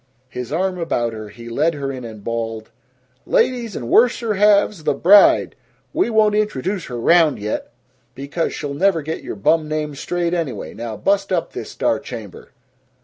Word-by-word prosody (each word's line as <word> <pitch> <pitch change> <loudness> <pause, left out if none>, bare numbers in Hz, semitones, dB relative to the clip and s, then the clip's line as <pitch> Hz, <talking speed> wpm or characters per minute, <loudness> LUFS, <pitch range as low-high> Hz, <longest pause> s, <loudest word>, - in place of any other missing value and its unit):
His 125 0 -6
arm 180 +3 -1
about 120 -8 -1
her, 110 -1 -8
he 115 +2 -12
led 150 +8 0
her 140 -1 -3
in 130 -2 -7
and 110 -3 -9
bawled, 115 -1 -4 0.6
"Ladies 240 -5 +1
and 120 - -5
worser 230 - +3
halves, 205 -3 +3
the - - +1
bride! 200 +4 +5 0.4
We - - +1
won't 215 -2 +3
introduce 205 -3 -1
her 120 -2 -6
round 165 +3 +4
yet, 105 +3 -4 0.4
because 140 +5 -3
she'll 145 -1 -5
never 170 +1 +2
get 160 +2 -4
your - - -6
bum 155 +10 +2
names 150 -2 -3
straight 175 -1 -2
anyway. 165 -7 -3
Now 115 -1 -6
bust 195 - 0
up 175 -3 -1
this - - -6
star - - 0
chamber!" - - -9
160 Hz, 170 wpm, -20 LUFS, 120-195 Hz, 0.6 s, bride